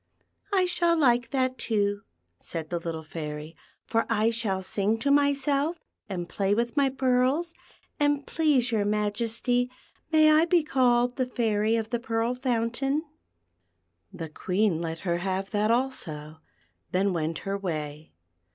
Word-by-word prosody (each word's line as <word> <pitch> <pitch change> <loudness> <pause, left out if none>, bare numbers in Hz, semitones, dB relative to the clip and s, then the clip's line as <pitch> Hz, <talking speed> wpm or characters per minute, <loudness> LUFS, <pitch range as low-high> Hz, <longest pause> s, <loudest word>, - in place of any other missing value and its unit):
" - - -49
I 380 -2 +3
shall 345 -1 +2
like 245 -5 +3
that, 260 -1 0
too," 205 -2 0 0.4
said 160 -1 -6
the 175 - -1
little 165 -1 -5
Fairy, 155 0 -6 0.2
" - - -40
for 225 0 0
I 225 0 +2
shall 205 -5 -1
sing 205 +3 0
to 280 +5 0
myself, 285 +2 +2 0.3
and 175 -3 -4
play 195 +2 0
with 235 +3 -1
my 280 -2 +3
pearls; 265 +5 +1 0.5
and, 290 -1 +2
please 285 -6 +2
your 215 -3 +2
Majesty, 225 +4 0 0.4
may 310 -1 +6
I 310 +2 +5
be 345 -1 +3
called 245 -3 +2
the 255 -2 0
Fairy 220 -3 +1
of 225 -1 -2
the 240 - 0
Pearl 230 +1 -1
Fountain." 250 +3 0 1.1
The 165 -1 -6
Queen 185 +2 0
let 165 -1 -4
her 170 -3 0
have 190 +1 -2
that 210 0 +1
also, 160 - -2 0.5
then 190 +1 +1
went 160 -1 -1
her 195 0 -1
way. 155 -5 -4
230 Hz, 150 wpm, -27 LUFS, 190-265 Hz, 1.1 s, may